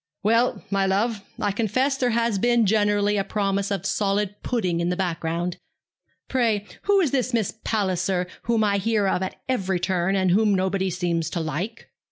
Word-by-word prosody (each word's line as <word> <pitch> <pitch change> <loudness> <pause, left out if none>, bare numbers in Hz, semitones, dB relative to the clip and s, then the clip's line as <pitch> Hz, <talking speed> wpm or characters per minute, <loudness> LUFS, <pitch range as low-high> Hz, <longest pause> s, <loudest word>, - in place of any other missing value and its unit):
'Well, 230 +4 +2
my 195 -1 +2
love, 205 +2 0 0.2
I 205 - +1
confess 255 +7 +1
there 255 -2 +1
has 230 -3 +1
been 240 +1 +3
generally 205 0 +2
a 195 - +1
promise 200 -1 -1
of 195 -2 -2
solid 200 0 0
pudding 185 -9 -1
in 170 +1 0
the 180 - 0
background. 170 -1 -2 0.7
Pray, 225 -5 +1 0.2
who 400 0 +4
is 310 -8 +1
this 255 -2 0
Miss 220 -4 0
Palliser, 185 -3 0 0.2
whom 230 -2 +2
I 200 -1 +2
hear 210 0 +1
of 190 - +1
at 190 - -3
every 195 -8 0
turn, 185 +1 0
and 185 -2 +2
whom 205 +1 +3
nobody 190 0 0
seems 170 -2 -1
to 170 - -3
like?' 170 - -4
200 Hz, 180 wpm, -24 LUFS, 185-225 Hz, 0.7 s, who